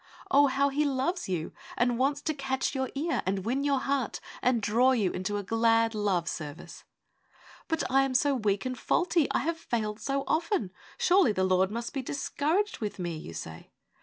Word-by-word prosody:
Oh, 285 +1 +6
how 275 +1 +2
He 290 +2 +1
loves 285 - -1
you, 170 -4 -2 0.2
and 245 0 +1
wants 280 +2 +1
to 315 - 0
catch 270 -2 -2
your 265 -2 -1
ear, 325 +4 0
and 190 +1 -2
win 260 +5 0
your 285 -1 +2
heart, 275 -2 -1 0.2
and 250 -2 +2
draw 235 +5 +3
you 210 -7 +1
into 195 +3 -2
a 205 - -3
glad 225 +2 +2
love 200 -5 0
service! 150 -3 -6 0.4
' - - -24
But 320 -2 0
I 270 +2 +4
am 270 -1 -1
so 285 +2 +3
weak 210 -5 0
and 255 0 -2
faulty, 335 +4 +1
I - - +1
have 330 +3 -1
failed 215 -6 -2
so 275 +5 -1
often. 320 - 0 0.3
Surely, 380 - +4
the 190 - 0
Lord 185 0 +3
must 235 +2 -5
be 270 - -2
discouraged 300 - -1
with 210 -2 -4
me,' 175 -3 -3
you 85 - -8
say. 80 0 -8
255 Hz, 195 wpm, -29 LUFS, 205-280 Hz, 0.4 s, Oh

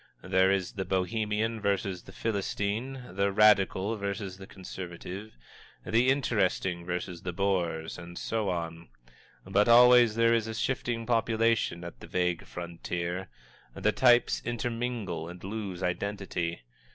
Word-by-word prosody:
There 95 0 +3
is 95 -2 0
the 95 - -3
Bohemian 105 +4 -1
versus 100 -2 -1
the 95 - -13
Philistine, 110 +5 -2
the 100 +2 +1
Radical 105 0 +4
versus 100 -1 -4
the 95 - -10
Conservative, 95 - -8 0.5
the 120 +3 +3
Interesting 95 -9 +1
versus 90 -1 -4
the 90 - -3
Bores, 85 -4 -1
and 85 0 -9
so 110 -3 -1
on. 85 -3 -4 0.6
But 105 +2 +3
always 120 -1 +7
there 115 0 +4
is 115 -1 +1
a 110 - -4
shifting 120 -1 -1
population 115 -6 +1
at 85 - -8
the - - -10
vague 90 -2 0
frontier 85 +1 -4 0.5
the 100 +2 +2
types 120 +1 +4
intermingle 115 -8 -3
and 90 0 -10
lose 100 -2 -5
identity. 90 -4 -2
100 Hz, 130 wpm, -29 LUFS, 90-115 Hz, 0.6 s, always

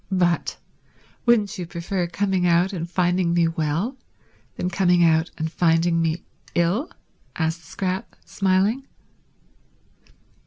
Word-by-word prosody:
"But 175 -2 +1 0.7
wouldn't 215 -5 +3
you 175 - -4
prefer 175 +1 -2
coming 190 0 0
out 175 +3 +3
and 170 -2 -4
finding 180 -1 +1
me 170 -1 +4
well 165 - -1 0.6
than 180 - -2
coming 175 -1 +3
out 160 0 +3
and 160 0 -3
finding 165 0 +2
me 165 +1 -1 0.3
ill?" 175 - +1 0.5
asked 160 +1 -1
Scrap, 185 +4 -3
smiling. 200 +7 +1
175 Hz, 115 wpm, -23 LUFS, 170-190 Hz, 0.7 s, me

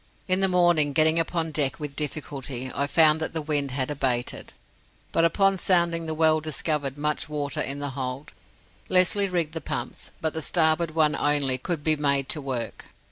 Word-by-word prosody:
In 185 0 +2
the 195 - +3
morning, 175 -5 +3
getting 160 +2 +4
upon 165 -1 -1
deck 145 -3 0
with 145 -2 -6
difficulty, 135 -4 -3
I 140 - -1
found 155 +1 +5
that 160 - -4
the 160 - -2
wind 145 -2 -1
had 130 +2 -2
abated, 130 -4 -2 0.6
but 165 - +2
upon 195 +3 +2
sounding 170 -2 +2
the 160 - -3
well 155 0 +3
discovered 150 -2 -2
much 150 +1 -2
water 145 -2 -3
in 140 - -2
the 145 -1 -4
hold. 130 +1 -5 0.6
Lesly 185 +2 +4
rigged 165 -3 -1
the 160 - -5
pumps, - - -5
but 160 -1 -2
the 160 - -4
starboard 160 0 +1
one 155 -2 +3
only 140 -3 +1
could 165 +1 -4
be 155 0 +2
made 140 -2 0
to 150 - -1
work. 125 -5 -5
150 Hz, 185 wpm, -25 LUFS, 140-165 Hz, 0.6 s, found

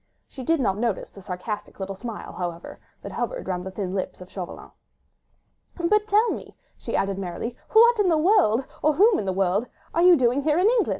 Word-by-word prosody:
She 260 - -9
did 330 +5 +2
not 205 -6 0
notice 230 -4 -2
the 195 - -13
sarcastic 195 +4 -6
little 195 0 -4
smile, 225 +3 -7
however, 175 -1 -6 0.2
that - - -7
hovered - - -4
round 180 -1 -2
the 190 - -5
thin 190 -1 -4
lips 190 -1 -3
of 180 +1 -12
Chauvelin. 180 -3 -8 1.0
"But 420 +5 +1
tell 440 +2 +3
me," - - -7 0.2
she - - -5
added 195 0 0
merrily, 195 +6 -4
"what 470 +1 +6
in 395 -3 +3
the 325 - +3
world, 305 - +3 0.2
or 305 - +3
whom 415 +7 +4
in - - -3
the 190 - 0
world, 195 +4 0 0.3
are 335 - +2
you 360 0 +8
doing 255 -1 +2
here 300 +2 +1
in 365 +3 +4
England?" 470 0 +2
240 Hz, 205 wpm, -24 LUFS, -, 1.0 s, you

